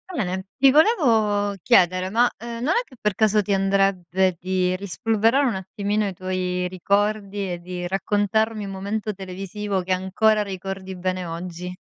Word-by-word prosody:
Bene! 190 - -2
Ti 270 0 +5
volevo 225 - +3
chiedere, 185 +2 +3
ma, 240 +4 +3
ehm, 235 0 -6
non 315 +6 +2
è - - +3
che 260 - -17
per 210 -1 0
caso 215 +1 +3
ti 200 0 -1
andrebbe 190 -2 +1
di 185 0 0
rispolverare 225 +7 +1
un 235 - -1
attimino 200 +2 -2
i 195 - -4
tuoi 180 0 -2
ricordi 200 +1 -1
e 175 - -4
di 180 0 -6
raccontarmi 205 +3 0
un 195 - -6
momento 205 +3 -3
televisivo 195 +1 -4
che 185 +1 -5
ancora 210 +3 +2
ricordi 190 -1 -6
bene 185 0 -2
oggi? 175 +2 -6
195 Hz, 155 wpm, -23 LUFS, 185-215 Hz, -, Ti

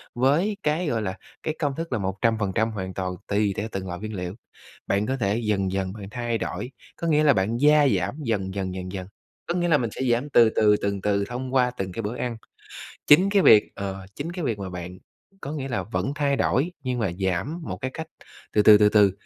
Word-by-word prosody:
với 155 - +2
cái, 155 +3 0
gọi 115 -5 0
là, 95 -2 -3 0.3
cái 155 - -2
công 145 -3 -1
thức 165 +2 -5
là - - +1
100% 105 +2 0
hoàn 95 -3 -5
toàn 90 -1 -3
tùy 100 -1 +1
theo 105 - -2
từng 95 -1 -4
loại 90 0 -5
nguyên 110 +1 -6
liệu. 90 -1 -4 0.5
Bạn 100 +2 +1
có 135 +3 -1
thể 105 -2 0
dần 100 -3 0
dần 95 -1 -2
bạn 100 -2 -8
thay 120 -1 -2
đổi, 125 - -4 0.3
có 170 - -3
nghĩa 155 -1 +3
là 145 -3 +6
bạn 105 +4 0
gia 150 +2 +5
giảm 95 +9 -3
dần 100 -6 -1
dần, 95 -2 -2
dần 90 0 -6
dần, 95 -1 -6 0.4
có 170 - 0
nghĩa 175 -1 +1
là 160 -3 +4
mình 120 -5 -1
sẽ 130 - -6
giảm 125 +5 0
từ 120 -4 +6
từ, 105 -1 +5
từng 100 -1 -1
từ 100 0 +1
thông 125 +3 -5
qua 125 -1 +3
từng 95 -1 -3
cái 115 - -4
bữa 110 +3 -4
ăn. 120 -2 -3 0.7
Chính 180 +7 +6
cái 200 -1 +4
việc, 105 -9 +6
ờ, 95 -1 -5
chính 160 +4 -4
cái 175 -3 -4
việc 115 -5 -1
mà 95 -2 -5
bạn 90 0 -7 0.4
có 140 - -5
nghĩa 140 -3 -4
là 105 -7 -1
vẫn 115 +7 -2
thay 140 -2 +1
đổi, 130 - +1
nhưng 125 -1 -1
mà 110 -6 0
giảm 95 - -1
một - - -5
cái 130 - -3
cách 160 - -5 0.5
từ 105 - +4
từ, 105 0 +8
từ 105 0 +6
từ, 105 -2 +5
110 Hz, 235 wpm, -25 LUFS, 95-140 Hz, 0.7 s, từ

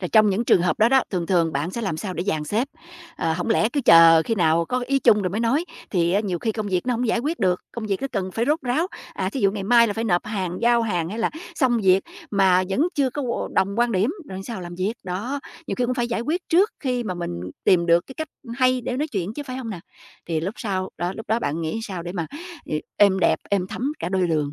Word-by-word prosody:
rồi 180 - -3
trong 215 -2 +5
những 205 +5 0
trường 175 - +4
hợp 180 - 0
đó 220 - +5
đó, 265 +1 +4
thường 175 -3 -2
thường 165 -3 +2
bạn 145 +6 -1
sẽ 235 - -4
làm 190 -7 -2
sao 185 +1 -5
để 175 - -3
dàn 155 -7 -1
xếp? 225 - -1 0.5
Ờ, 165 - 0
hổng 175 +6 -2
lẽ 220 -1 +3
cứ 285 +4 -1
chờ 165 -1 +8
khi 225 - -1
nào 170 -3 +2
có 250 +7 -2
ý 275 +1 +2
chung 210 -5 +4
rồi 185 - -1
mới 210 +5 -2
nói, 250 +8 +1 0.3
thì 175 -2 +1
á 200 - +3
nhiều 185 -5 -2
khi 220 +5 -1
công 215 -1 -3
việc 185 +3 -1
nó 250 - +1
hổng 245 +2 -1
giải 230 - +1
quyết 300 +8 -2
được, 180 -3 +1
công 225 -2 -5
việc 195 -2 -1
nó - - +1
cần 190 -3 -2
phải 225 - 0
rốt 305 +2 +2
ráo, 265 +8 0 0.3
à, 185 - -1
thí 265 - -4
dụ 195 - +4
ngày 200 -1 -4
mai 235 +3 +5
là 210 - -1
phải 225 +3 -3
nộp 175 -5 +1
hàng, 190 -4 -3
giao 235 0 +4
hàng 175 -7 -1
hay 215 - -5
là 230 - +1 0.2
xong 255 -7 +2
việc 190 0 +5 0.3
mà 190 -2 +4
vẫn 195 +7 0
chưa 270 -3 +1
có 255 -3 -3
đồng 195 +1 +2
quan 240 0 +2
điểm, 200 +7 +2 0.2
rồi 190 0 -6
sao 230 -6 -5
làm 175 0 -7
việc? 190 +5 -1
Đó, 210 +10 -3 0.3
nhiều - - -2
khi 250 - 0
cũng 250 - 0
phải 240 -1 -1
giải 235 -1 -1
quyết 330 +8 -2
trước 375 +6 +4
khi 250 -3 -1
mà 185 -4 -3
mình 175 - -4 0.3
tìm 175 -2 +4
được 170 +1 +3
cái 265 - -11
cách 315 +2 -5 0.3
hay 255 0 +3
để 250 +1 -3
nói 305 +3 -1
chuyện 200 -2 -3
chứ, 290 - -4
phải 255 - -5
hông 245 -4 -5
nào? 180 - -6 0.5
Thì 165 -2 -1
lúc 190 +6 -3
sau, 190 -4 -2
đó, 175 +2 -1
lúc 220 - -8
đó 220 +2 +2
bạn 165 -8 -2
nghĩ 165 +8 -2
sao 190 -6 -5
để 175 +1 -6
mà 170 -4 -3 0.4
ê 155 - -2 0.2
êm 200 -2 +5
đẹp, - - +3
êm 195 -2 +1
thấm 270 +8 -2
cả 170 - -3
đôi 185 -1 +1
đường. 150 -3 0
205 Hz, 280 wpm, -23 LUFS, 180-240 Hz, 0.5 s, chờ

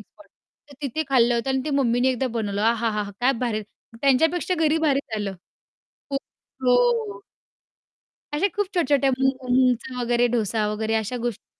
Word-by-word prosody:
Spot - - -21 0.4
तर - - -12
तिथे 285 +3 -1
खाल्लं 240 -2 +4
होतं 235 +3 -1
अन् 265 -1 0
ती 305 - -2
मम्मी 245 -2 +2
ने 255 - +3
एकदा 260 0 0
बनवलं 205 -3 -2
अहा! 230 0 +2
हा! 210 0 -1
हा! 200 - -7
काय 255 +2 +4
भारी. 215 -3 -1 0.4
त्यांच्यापेक्षा 320 +7 +2
घरी 310 +2 +2
भारीच 280 -1 +2
झालं. 205 -2 -3 0.8
खूप 275 0 -1 0.5
हो. 235 -5 +2 1.1
अशा 360 +7 +2
खूप 410 - +1
छोट्या-छोट्या 285 -5 +2
मूग 265 -1 0
मुंगचा 250 0 +2
वगैरे 240 0 +2
डोसा 215 -1 0
वगैरे 220 +1 -1
अशा 220 +3 -2
गोष्टी 235 -4 -5
245 Hz, 165 wpm, -24 LUFS, 225-270 Hz, 1.1 s, खाल्लं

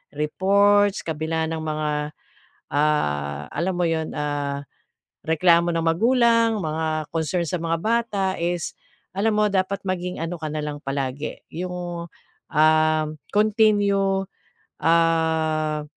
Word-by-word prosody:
reports, 200 +6 +3
kabila 160 0 -2
ng 165 - -2
mga, 155 -1 -2 0.8
ah, 75 - 0
alam 185 +2 -1
mo 175 - +1
'yun, 160 -1 -2
ah, 145 -1 -2 0.6
reklamo 170 +1 +3
ng 165 - 0
magulang, 230 +4 +3
mga 155 0 -2
concern 165 +2 0
sa 180 - -1
mga 165 0 0
bata 220 -3 0
is 175 0 -2 0.4
alam 215 +2 +2
mo 210 - +4
dapat 195 +1 0
maging 180 -1 -3
ano 165 +1 -3
ka 155 - -3
na 155 - -3
lang 150 -1 -4
palagi 135 +1 -4
'yung, 175 0 -5 0.5
ah, 155 0 +4 0.3
continue, 205 -2 +3 0.6
ah, 160 -2 +2
165 Hz, 115 wpm, -23 LUFS, 155-195 Hz, 0.8 s, mo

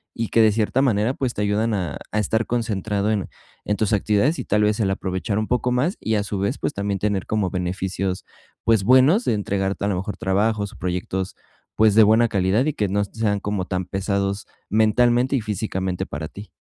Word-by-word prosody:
Y 115 -1 -2
que 115 - +4
de 110 -1 +5
cierta 110 +5 +1
manera, 115 -2 +2
pues, 130 -3 -2
te - - -2
ayudan 105 +2 +1
a 90 -7 -3
a 105 - 0
estar 110 +2 0
concentrado 105 -3 -1
en 100 -3 -1 0.4
en 105 - 0
tus 110 +1 0
actividades, 105 - +2
y - - -2
tal 105 +1 +2
vez 105 +1 +1
el 95 - +1
aprovechar 95 +2 -2
un 110 - -2
poco 125 0 0
más, 140 - 0
y 110 - -1
a 105 - +1
su 100 -1 -4
vez, 100 +8 -1
pues - - -2
también 100 0 -2
tener 100 -3 -1
como 105 -4 0
beneficios, 95 +1 -3 0.4
pues, 110 -4 +3
buenos 130 - +5
de - - +2
entregarte 100 -1 -2
a - - +1
lo 100 - 0
mejor 100 +3 -4
trabajos 100 +2 0
o - - -14
proyectos, 90 +1 -3 0.4
pues, 110 -1 +4
de 110 - +8
buena 110 +3 +5
calidad, 100 +3 +1
y 155 - 0
que 105 -2 -1
no 100 +2 +1
sean 105 0 -1
como 100 -2 -2
tan 90 -1 -2
pesados 100 +1 -2 0.2
mentalmente 120 +5 +3
y - - -1
físicamente 95 -3 -3
para 75 +2 -5
ti. 100 +5 -11
105 Hz, 215 wpm, -22 LUFS, 95-110 Hz, 0.4 s, de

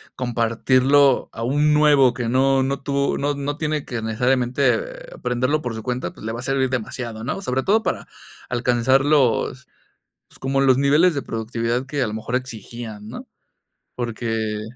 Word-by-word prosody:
compartirlo 130 +3 +2
a 115 - -7
un 145 +5 +2
nuevo 145 -4 +5
que 120 -2 -3
no 135 +1 +3
no 135 +1 -1
tuvo 140 0 0
no 145 +1 0
no 145 +1 -4
tiene 155 -2 -1
que 120 -3 -5
necesariamente, 130 - 0
aprenderlo 130 +5 -1
por 120 -2 -3
su 110 - -6
cuenta, 125 +2 -3
pues, - - -14
le 110 - -2
va 120 +2 -5
a - - -8
servir 135 -1 0
demasiado, 115 -2 -4
¿no?, 195 - -3
sobre 130 -6 -1
todo 220 +3 +3
para - - -3 0.4
alcanzar 125 +2 +2
los 140 -2 +1 0.6
pues, - - -20
como 135 +1 0
los 130 -2 +4
niveles 150 +6 +4
de 140 - -1
productividad 115 +2 -2
que 140 +1 -3
a 125 - +1
lo 105 - -5
mejor 110 +3 -3
exigían, 115 -3 -6
¿no?, - - -8 0.7
porque 110 -3 -3
130 Hz, 170 wpm, -22 LUFS, 115-140 Hz, 0.7 s, nuevo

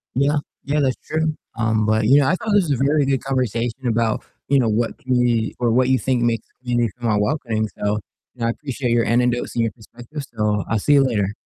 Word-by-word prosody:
Yeah, 140 +3 +2 0.3
yeah, 145 +2 0
that's 130 -2 +1
true, 160 0 0 0.2
um, 110 -2 +1
but, 110 0 +2
you 135 +5 +6
know, 140 - +3
I - - +3
thought 215 +3 -4
this 205 - +5
was 135 -4 +1
a 135 - +2
very 145 0 +3
good 135 -1 0
conversation 125 -1 -2
about, 115 -1 0 0.3
you 140 -1 +4
know, 120 - +2
what 115 +2 0
community 125 -3 +1
or 120 -2 +2
what 125 +2 +3
you 130 - +3
think 130 -2 0
makes 115 -1 0
a - - -41
community 120 -3 0
feel 120 -1 -1
more 105 -1 +2
welcoming, 110 -3 -1
so, 105 +1 0 0.4
you 125 - -13
know, 115 - +1
I - - +1
appreciate 130 -1 -3
your 115 -1 +3
anecdotes 120 +1 +1
and 115 - +2
your 115 - 0
perspective, 120 +6 -10
so 105 -2 0
I'll 110 - +1
see 145 - +2
you 140 -1 +5
later. 105 -5 0
120 Hz, 240 wpm, -21 LUFS, 115-135 Hz, 0.4 s, you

